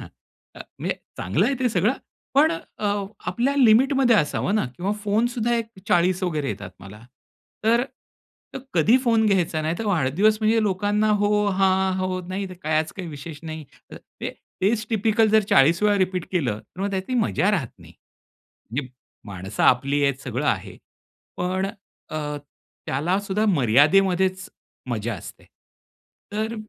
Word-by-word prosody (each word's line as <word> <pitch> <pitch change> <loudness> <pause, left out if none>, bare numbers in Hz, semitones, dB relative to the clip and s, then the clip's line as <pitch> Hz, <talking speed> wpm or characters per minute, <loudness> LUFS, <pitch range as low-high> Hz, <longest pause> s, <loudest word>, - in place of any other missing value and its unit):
हां, - - -9 0.5
अ, - - -12 0.2
म्हणजे - - -2 0.2
चांगलं - - +1
आहे 275 - +1
ते 250 - +2
सगळं. 210 +3 +2 0.4
पण 310 +4 +5
अ, 215 -9 -6 0.4
आपल्या 265 +4 0
लिमिटमध्ये 255 0 +5
असावं 180 +5 0
ना 215 - +2
किंवा 190 +4 -1
फोनसुद्धा 235 +3 +1
एक 230 -1 -2 0.2
40 180 +2 +2
वगैरे 155 -6 -1
येतात 90 - -6
मला. 100 +3 -12 0.6
तर 235 +2 +4 0.9
कधी 205 +10 +5
फोन 225 -2 +3
घ्यायचा 175 -5 +1
नाही, 160 +2 -1
तर 225 - -3
वाढदिवस 195 +5 +2
म्हणजे 220 +1 +3
लोकांना 205 +2 +1
हो, 210 0 +2
हां. 190 0 +2
हो, 185 0 -2
नाही 190 +1 -3
तर 185 - -9
कायच 155 0 0
काही 185 -3 -7
विशेष 150 +1 -8
नाही. 160 -1 -7 0.3
तर - - -8 0.2
ते - - -3 0.3
तेच 215 +2 +1
टिपिकल 220 0 +2
जर 220 0 +6
40 160 +8 +5
वेळा 205 -1 +4
रिपीट 185 -1 0
केलं, 125 - 0
तर 185 - -14
मग 200 +1 -1
त्यातली 195 +6 -3
मजा 215 -3 +2
राहत 165 - 0
नाही. 85 -1 -15 0.8
म्हणजे 130 +1 -3 0.4
माणसं 95 -1 -4
आपली 140 +3 +3
आहेत 140 -1 +1
सगळं 125 +3 -3
आहे. 95 -2 -2 0.6
पण 185 +2 -1 0.4
अ, 155 - -4 0.7
त्याला 170 +9 0
सुद्धा 205 +2 -1
मर्यादेमध्येच 185 - +3 0.4
मजा 115 0 -2
असते. - - -11 0.9
तर 220 +2 -2
190 Hz, 150 wpm, -23 LUFS, 155-215 Hz, 0.9 s, जर